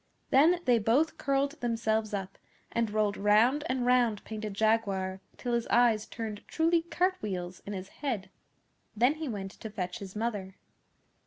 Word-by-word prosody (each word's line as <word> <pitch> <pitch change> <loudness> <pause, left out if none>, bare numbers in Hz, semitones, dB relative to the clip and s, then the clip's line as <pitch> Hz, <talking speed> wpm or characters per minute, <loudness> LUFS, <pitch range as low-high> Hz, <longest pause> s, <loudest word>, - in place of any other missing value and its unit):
Then 330 +6 +5
they 245 -2 +4
both 245 +9 +2
curled 280 +2 0
themselves 220 -2 0
up 195 -2 -5 0.3
and 230 -1 0
rolled 210 -1 0
round 220 +8 +4
and 255 -1 0
round 245 -4 +3
Painted 215 -2 -5
Jaguar 200 -3 +1 0.2
till 245 -1 -3
his 235 0 0
eyes 230 -3 +3
turned 220 -3 -5
truly 330 +1 +2
cart 365 +3 0
wheels 180 -3 -4
in 205 - -4
his 190 0 -6
head. 215 -10 -4 0.6
Then 245 +6 +4
he 315 0 -5
went 195 -4 -4
to 220 - -8
fetch 180 -4 -4
his 195 -1 -9
mother. 210 -4 -3
220 Hz, 160 wpm, -30 LUFS, 200-255 Hz, 0.6 s, Then